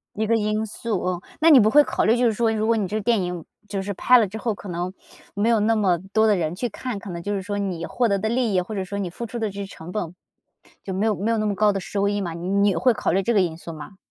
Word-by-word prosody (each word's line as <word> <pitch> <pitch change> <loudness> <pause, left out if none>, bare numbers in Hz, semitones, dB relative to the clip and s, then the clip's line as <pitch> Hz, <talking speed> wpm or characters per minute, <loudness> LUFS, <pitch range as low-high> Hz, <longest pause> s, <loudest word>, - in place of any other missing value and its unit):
一 220 +1 -1
个 230 - +2
因 215 0 0
素， 215 -1 -3
嗯， 180 -1 -1 0.2
那 325 +1 +6
你 280 -5 +9
不 215 0 +4
会 295 +4 +7
考 - - -1
虑， 225 +3 +4
就 245 0 +2
是 225 - +3
说 225 +1 +1
如 215 0 -1
果 230 0 +3
你 210 -3 0
这 215 +2 -2
电 225 0 +2
影 180 -2 -4 0.2
就 200 -1 -3
是 200 +1 -3
拍 250 +6 +5
了 225 - +3
之 205 +3 -7
后， 225 -1 -1
可 200 - -11
能 175 +1 -3 0.4
没 205 +3 +1
有 230 -2 +3
那 225 +2 +2
么 190 -5 +2
多 220 0 +4
的 210 -2 +4
人 165 -2 -2
去 245 +5 -2
看， 235 +1 -5
可 200 -1 -9
能 170 -1 -6
就 205 +4 -2
是 195 - -2
说 205 +1 -3
你 185 -4 -3
获 245 -2 0
得 200 -1 +1
的 220 +3 -1
利 235 -3 0
益， 185 - +3
或 190 +5 -6
者 195 -2 -2
说 200 +2 -5
你 190 -3 -3
付 235 +7 -6
出 235 - -6
的 220 -2 -1
这 200 +1 -7
些 200 - -4
成 175 -2 -10
本， 180 -5 -4 0.7
就 190 - -5
没 195 +4 0
有 220 -2 +2
没 205 +6 -1
有 230 - +1
那 215 - 0
么 205 -1 0
高 210 +2 +3
的 195 - -2
收 200 +2 -1
益 205 0 0
嘛， 175 -3 -3
你 170 +2 -6
你 200 -1 +3
会 230 +9 +3
考 - - -1
虑 195 +3 +1
这 235 - +1
个 200 - +4
因 165 -3 -2
素 170 0 -8
吗？ 155 +5 -10
205 Hz, 345 characters per minute, -23 LUFS, 185-220 Hz, 0.7 s, 你